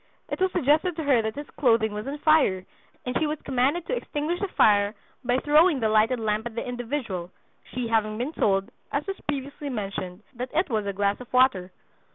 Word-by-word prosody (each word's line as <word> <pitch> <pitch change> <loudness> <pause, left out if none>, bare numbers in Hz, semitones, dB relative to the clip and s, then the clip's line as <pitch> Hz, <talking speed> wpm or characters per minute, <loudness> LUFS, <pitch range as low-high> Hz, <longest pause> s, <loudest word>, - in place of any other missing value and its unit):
It - - -4
was 375 0 +3
suggested 315 +1 +2
to 320 - -3
her 270 -5 +4
that 220 0 -3
his 290 +1 -6
clothing 225 -5 +3
was 210 +4 -5
on 285 +2 -4
fire 290 -12 +3 0.4
and 250 0 -3
she 315 - +1
was 300 0 -3
commanded 275 +6 +1
to - - -1
extinguish 330 -6 -3
the 400 - -1
fire 205 - +3 0.3
by 245 0 +1
throwing 300 +2 +4
the 220 -2 +1
lighted 220 +3 +3
lamp 215 +1 -1
at 230 - -10
the 235 - -3
individual, 240 -7 -4 0.4
she 250 -1 -3
having 215 -1 +1
been 255 +7 -3
told, 195 -1 +1 0.2
as 285 - -1
was 390 0 -5
previously 285 0 -4
mentioned, 195 -4 -5
that 250 +1 -5
it 330 -3 +1
was 215 -2 0
a 200 - -1
glass 200 +1 0
of 245 - -12
water. 250 -8 +3
250 Hz, 205 wpm, -26 LUFS, 215-295 Hz, 0.4 s, her